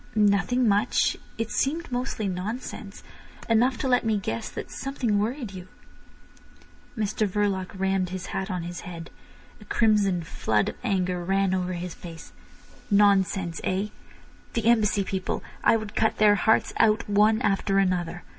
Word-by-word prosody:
"Nothing 210 +4 +3
much. 205 0 +2 0.2
It 225 0 -3
seemed 315 +2 -1
mostly 245 -3 -2
nonsense. 200 +3 -5 0.4
Enough 235 +3 +3
to 265 - -2
let 250 -1 +3
me 220 -2 +1
guess 115 - -3
that - - -7
something 250 -6 -1
worried 230 0 -3
you." 185 -1 -9 1.3
Mr 215 0 0
Verloc 195 -1 -1
rammed 190 -1 +1
his 185 0 -5
hat 190 - -2
on 180 -2 -3
his 175 +1 -6
head. 170 -2 -8 0.5
A - - -13
crimson 205 -6 +2
flood 110 -9 0
of - - -7
anger 180 -3 0
ran 195 +1 +1
over 185 -1 -1
his 175 0 -5
face. 165 -2 -11 0.6
"Nonsense—eh? 195 -1 +2 0.6
The 230 -2 -1
Embassy 215 -3 +3
people! 190 -1 -3 0.2
I - - +5
would 215 -2 -7
cut 220 - +1
their 210 -1 +6
hearts 220 +2 +2
out 220 0 +3
one 210 +2 +4
after 195 0 +1
another. 180 -2 0
200 Hz, 145 wpm, -26 LUFS, 185-220 Hz, 1.3 s, their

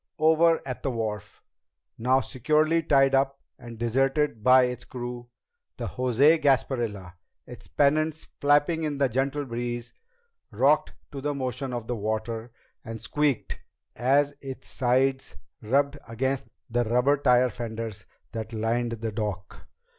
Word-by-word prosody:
Over 160 +1 +4
at 125 - -5
the 140 - -1
wharf, 105 -4 -4 0.6
now 130 +3 +3
securely 155 +7 +1
tied 135 -3 +3
up 135 0 +2 0.2
and 120 -2 -10
deserted 135 +1 0
by 130 +1 +7
its 125 -1 -2
crew, 120 -1 -7 0.5
the - - -4
José 135 +6 +3
Gasparilla, 120 - 0 0.3
its - - -11
pennants 155 +2 +1
flapping 145 +3 +2
in 150 -2 -2
the 140 -1 +3
gentle 135 +4 -1
breeze, 120 -1 -4 0.6
rocked - - +2 0.2
to 140 - -6
the 145 +1 -2
motion 130 0 -3
of 120 -2 -4
the 120 - -3
water 110 +2 -3 0.3
and 115 0 -7
squeaked 140 +2 -1 0.3
as 140 +4 +2
its 135 -1 -8
sides 130 +1 0 0.3
rubbed 140 +5 +1
against 130 +4 -2 0.2
the 120 -1 0
rubber 125 +5 +2
tire 125 -2 +3
fenders 110 -3 -6 0.2
that 115 0 -6
lined 115 +2 -1
the 115 0 -4
dock. 105 -4 -5
125 Hz, 135 wpm, -26 LUFS, 115-140 Hz, 0.6 s, by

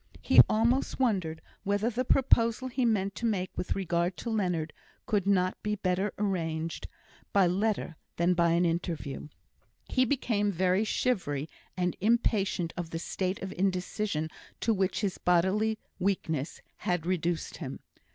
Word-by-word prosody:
He - - +8
almost 235 +6 +1
wondered 185 -11 0 0.2
whether 205 +4 +1
the 245 +3 -1
proposal 250 -1 +3
he 250 0 0
meant 200 -4 +1
to 235 - -4
make 185 -4 -2
with - - -2
regard 175 -1 0
to 235 - -4
Leonard 180 -7 -1 0.3
could 200 -3 0
not 185 -2 +2
be 210 0 -1
better 190 0 0
arranged 165 -5 -2 0.4
by 195 -2 +5
letter 195 -1 0 0.2
than 170 +2 +3
by 170 -1 +3
an 175 +1 +3
interview. 165 -5 -2 0.6
He 255 - +2
became 225 -6 +1
very 185 +2 +2
shivery, 170 - 0 0.3
and 180 -1 0
impatient 200 -5 +1
of 175 -2 -4
the 165 - -4
state 185 +3 -3
of 190 - -4
indecision 185 -3 -1 0.3
to 225 - +2
which 190 0 0
his 200 -3 -2
bodily 190 +5 +2 0.2
weakness 160 -6 -1 0.2
had 175 -3 -1
reduced 175 -2 -1
him. 135 -6 -6
190 Hz, 145 wpm, -29 LUFS, 170-215 Hz, 0.6 s, He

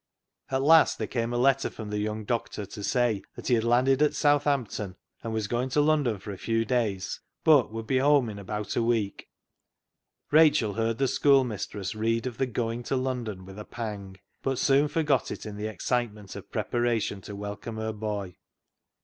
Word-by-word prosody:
At 130 0 0
last 160 +2 +6
there - - -2
came 115 -1 -2
a 120 - -1
letter 135 +2 +3
from 110 -2 -8
the 105 - -1
young 105 0 -3
doctor 115 -2 -2
to 100 +2 -9
say 120 -3 +1
that - - -6
he - - +4
had 115 -2 +3
landed 130 +4 +3
at 150 - +3
South 145 -1 +3
ampton, 110 -9 -1 0.3
and 115 - -4
was 110 -2 -1
going 120 +4 -1
to 145 +3 +2
London 145 -7 +2
for 100 +2 -8
a 95 - -8
few 115 0 0
days, 110 -7 -1 0.2
but 145 -8 +5
would 115 0 -5
be 130 +2 +1
home 140 -2 +4
in 105 -2 -6
about 105 +1 -4
a - - +2
week, 115 -4 -1 1.0
Rachel 150 -9 +5
heard 115 +1 0
the 135 - +2
schoolmistress 115 -9 +1
read 115 +2 0
of 125 -3 -5
the 135 - +1
going 115 0 -2
to 130 - -2
London 120 -7 -3
with 95 +2 -10
a - - -5
pang, 105 -4 -6 0.2
but 135 -1 -1
soon 140 +2 +3
forgot 150 -3 +1
it - - -6
in 105 -1 -6
the 105 +1 -3
excitement 110 -1 -3
of - - -10
preparation 120 -4 -1
to 100 - -8
welcome 105 +2 -6
her 110 0 -2
boy. 105 -4 -4
115 Hz, 195 wpm, -27 LUFS, 105-130 Hz, 1.0 s, last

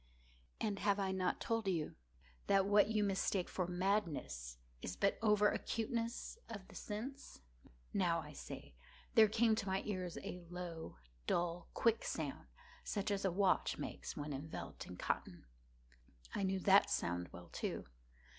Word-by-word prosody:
And 205 -3 0
have 200 -1 +3
I 195 -1 +1
not 185 -1 0
told 225 -3 0
you 165 -5 0 0.5
that 195 -1 +5
what 205 +1 +6
you 215 -1 +2
mistake 195 -2 +1
for 180 -2 -1
madness 170 - 0 0.2
is 90 - -4
but 200 - +2
over 210 -1 +5
acuteness 230 - -2
of 200 -4 -7
the - - -12
sense?—now, 170 - -3
I 150 -1 -10
say, - - -8 0.4
there 220 -1 +8
came 220 +2 +4
to 215 -2 -1
my 190 0 +1
ears 185 -4 -2
a 180 0 -5
low, 170 - -6 0.3
dull, 175 0 0
quick 230 -1 +3
sound, - - -3 0.4
such 205 -1 -1
as 200 -1 0
a 190 - +3
watch 190 +1 +3
makes - - -5
when 145 0 -3
enveloped 145 +4 -6
in 90 - -8
cotton. - - -2 0.9
I - - -1
knew 190 0 +2
that 195 +1 +7
sound 90 0 0
well, 90 -1 -10
too. - - -3
190 Hz, 150 wpm, -38 LUFS, 165-210 Hz, 0.9 s, there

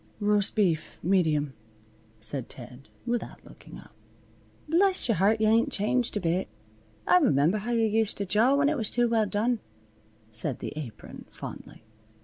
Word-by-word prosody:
"Roast 205 -1 +1
beef, 175 -7 0
medium," 155 -6 +1 0.7
said 125 +3 -2
Ted, 125 +2 -11 0.2
without 240 -1 -4
looking - - -13
up. - - -15 0.8
"Bless 370 +2 +3
your 230 - +1
heart, 205 +5 +3
yuh 215 - +2
ain't 225 +2 +3
changed 225 +3 +1
a - - 0
bit. 175 +1 -1 0.6
I 180 0 +5
remember 155 +9 +2
how 215 +4 -6
yuh 230 -1 +2
used 220 0 0
to 200 - -2
jaw 220 +8 +3
when 285 0 +3
it 305 0 +1
was 220 -4 -2
too 240 0 +2
well 225 -2 +1
done," 225 +4 0 0.7
said 110 +4 -2
the - - -6
Apron, 140 -8 -9
fondly. - - -10
210 Hz, 160 wpm, -27 LUFS, 160-230 Hz, 0.8 s, I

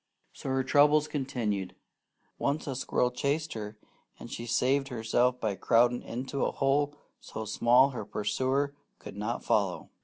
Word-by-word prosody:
So - - -7
her 130 0 +1
troubles 145 +3 +4
continued. 120 -10 -2 0.6
Once 145 +2 -1
a 135 - -3
squirrel 125 -1 0
chased 145 +5 -1
her, 105 -1 -6 0.4
and - - -10
she 120 - -6
saved 135 +4 +2
herself 125 +1 +1
by 110 -4 -1
crowding 120 +5 +3
into 130 +3 -4
a - - +2
hole 145 +1 +1 0.2
so 110 - -7
small 120 +5 +4
her 125 - -5
pursuer 130 +7 -1 0.2
could - - -10
not 105 +4 -3
follow. 100 -4 0
125 Hz, 150 wpm, -29 LUFS, 110-140 Hz, 0.6 s, troubles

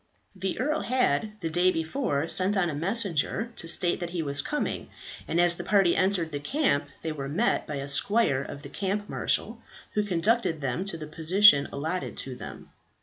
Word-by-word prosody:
The 190 0 -3
earl 300 +4 0
had 220 - +1
the 165 - -2
day 175 +3 +3
before 160 - -1
sent 190 +4 +2
on 175 -4 +1
a - - -5
messenger 195 +5 -1
to 165 - -4
state 175 +1 +1
that 175 -2 -4
he 170 -2 -3
was 140 -1 +1
coming, 295 - -3 0.4
and 170 - 0
as 175 -1 +4
the - - -5
party 195 -4 +3
entered 185 -4 +1
the 145 - -3
camp 200 - +1 0.2
they 160 - -2
were 140 -3 -5
met 210 +12 +1
by 150 - -4
a 140 0 -4
squire 145 - +2
of 140 +1 -8
the 140 - -8
camp 200 +5 -2
marshal, 230 +3 -2 0.3
who 210 - +2
conducted 205 -2 +1
them 140 +6 -2
to 195 -4 -3
the 155 - -7
position 160 0 +5
allotted 160 +6 -3
to 135 - -2
them. 125 - -10
175 Hz, 195 wpm, -27 LUFS, 150-205 Hz, 0.4 s, position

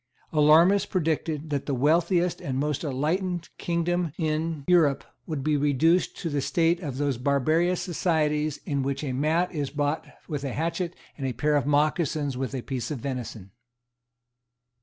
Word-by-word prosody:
Alarmists 160 +6 +5
predicted 160 -3 -1
that 140 -2 -2
the 140 - 0
wealthiest 170 +6 +2
and 130 -2 -3
most 145 +1 -1
enlightened 170 +5 -1
kingdom 170 -1 -1
in 155 -1 -1
Europe 155 -6 +4 0.2
would 155 -4 -3
be 155 +1 +2
reduced 150 +5 +2
to - - -4
the 145 -1 0
state 165 +5 +2
of 145 -8 -5
those 140 -4 -1
barbarous 155 +7 +2
societies 155 -4 0
in 140 -2 -1
which 140 +2 -2
a 135 -3 -2
mat 160 +7 +1
is 145 -4 -2
bought 145 +1 -1 0.2
with 150 -4 -4
a 135 -3 -3
hatchet, 170 +2 -2 0.2
and 135 - -2
a 130 - -2
pair 150 +5 +1
of 145 -1 +1
mocassins 150 -1 +1
with 130 +1 -3
a 125 - -4
piece 125 -4 -4
of 150 - -3
venison. 120 -7 -6
150 Hz, 160 wpm, -26 LUFS, 140-165 Hz, 0.2 s, Alarmists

